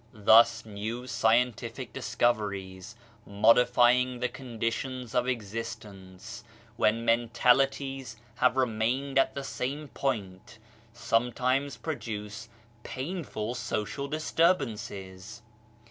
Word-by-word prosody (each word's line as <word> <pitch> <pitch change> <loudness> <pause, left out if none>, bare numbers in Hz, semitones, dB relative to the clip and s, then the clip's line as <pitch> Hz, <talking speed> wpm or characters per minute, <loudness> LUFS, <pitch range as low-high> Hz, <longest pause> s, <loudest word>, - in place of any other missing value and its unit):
Thus 110 +3 +5
new 110 +4 -5
scientific 120 0 0
discoveries, 105 -5 -2 0.3
modifying 125 +4 +4
the 125 0 0
condi 115 -3 -3
tions 130 -2 -6
of 125 0 +1
existence, 110 -2 -6 0.3
when 115 +1 +1
mentalities 125 +2 +1 0.2
have 125 +1 +3
remained 130 +3 +1
at 135 - +2
the 140 - -4
same 140 +3 -4
point, 110 -3 -4 0.3
sometimes 125 +4 0
produce 110 -7 -6 0.3
painful 130 - -4
social 120 +2 -3
disturbances. 115 - -1
120 Hz, 85 wpm, -28 LUFS, 110-130 Hz, 0.3 s, Thus